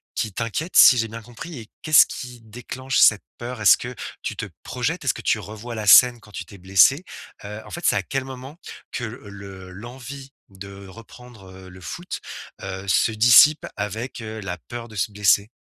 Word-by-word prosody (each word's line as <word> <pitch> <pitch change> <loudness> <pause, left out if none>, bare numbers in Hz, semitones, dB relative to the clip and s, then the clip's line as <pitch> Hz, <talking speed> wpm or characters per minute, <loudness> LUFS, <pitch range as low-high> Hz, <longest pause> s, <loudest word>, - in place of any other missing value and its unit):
qui 110 - -2
t'inquiète 115 - -4
si 130 - +9
j'ai 115 -1 -1
bien 115 +1 -8
compris 120 +6 -10
et 110 - -11
qu'est-ce 155 -2 +6
qui 125 -2 -8
déclenche 125 +4 -4
cette 105 -3 +5
peur? 120 -1 -7
Est-ce 105 - +7
que 120 +1 -7 0.3
tu - - -4
te - - -4 0.2
projettes, - - -3
est-ce - - +2
que - - -9
tu - - +1
revois 110 +3 -8
la 110 -2 -5
scène 120 +1 +7
quand 110 -1 -17
tu 95 - -7
t'es 100 +4 -14
blessé? 95 - +4 0.4
Heu, 105 +2 -7
en - - -12
fait, 175 - -6
c'est - - +3
à 95 - -1
quel 135 +6 -3
moment 130 +3 -10 0.3
que 125 - -5
le 100 -4 -10
l'envie 130 +7 -10 0.2
de 100 0 -11
reprendre, 115 0 -14
heu, 95 0 -13
le 90 0 -14
foot, 175 - -7 0.4
heu, 95 0 -6
se 95 - +2
dissipe 125 +7 +6
avec, 110 +5 -5
heu, 110 0 -7
la 90 -2 -5
peur 120 -1 -7
de 110 - -13
se 105 +1 -1
blesser? 100 0 +2
110 Hz, 200 wpm, -22 LUFS, 100-125 Hz, 0.4 s, si